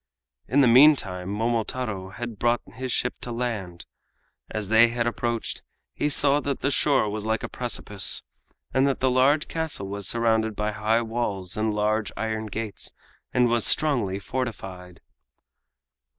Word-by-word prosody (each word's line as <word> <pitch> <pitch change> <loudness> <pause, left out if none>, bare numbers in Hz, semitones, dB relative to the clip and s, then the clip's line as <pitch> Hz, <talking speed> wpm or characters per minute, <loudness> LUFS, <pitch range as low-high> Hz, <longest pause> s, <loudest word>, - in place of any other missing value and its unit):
In 140 +5 +3
the 130 - +5
meantime, 115 -8 +5
Momotaro 110 -2 -2
had 115 +1 -7
brought 120 0 +2
his 130 +2 -4
ship 125 - 0
to 120 - -5
land. 110 -8 -4 0.6
As 105 -2 -4
they 110 +1 +7
had 115 0 -1
approached, 120 -1 -2 0.3
he 150 - -1
saw 145 0 +3
that 140 -2 -3
the 140 - +1
shore 135 -4 +3
was 105 0 -3
like 110 +1 -1
a - - -2
precipice, 110 -5 0 0.5
and 130 +1 +3
that 135 - 0
the 130 0 +2
large 140 +4 +3
castle 160 -11 -3
was 100 0 -3
surrounded 110 -2 +1
by 105 +1 -1
high 110 +3 +1
walls 110 -6 -3
and 110 0 0
large 105 0 0
iron 110 -1 -2
gates 105 -1 -4 0.4
and 125 -1 +3
was 120 -1 +1
strongly 120 -11 +2
fortified. 95 -6 -6
115 Hz, 150 wpm, -25 LUFS, 105-125 Hz, 0.6 s, they